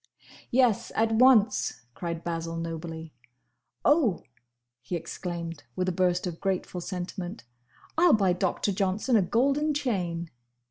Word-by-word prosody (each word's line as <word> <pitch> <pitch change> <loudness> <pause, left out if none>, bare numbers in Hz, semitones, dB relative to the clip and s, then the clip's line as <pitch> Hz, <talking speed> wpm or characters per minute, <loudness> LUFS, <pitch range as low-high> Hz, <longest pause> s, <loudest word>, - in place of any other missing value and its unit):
"Yes! 245 -4 +2
at 225 0 +2
once!" 225 - +4
cried 170 +1 -5
Basil, 165 -1 -3
nobly. 165 -1 -5 0.7
"Oh!" 290 - +3 0.6
he 125 +9 -4
exclaimed, 170 -1 -5
with 185 0 -1
a - - +2
burst 180 0 +1
of 175 -2 -5
grateful 185 -2 -2
sentiment, 175 - -5 0.6
"I 355 - +6
'll 335 - +6
buy 195 -4 +4
Doctor 185 +3 0
Johnson 195 +5 0
a 215 - +6
golden 275 - +1
chain!" 175 - -2
185 Hz, 130 wpm, -28 LUFS, 170-225 Hz, 0.7 s, I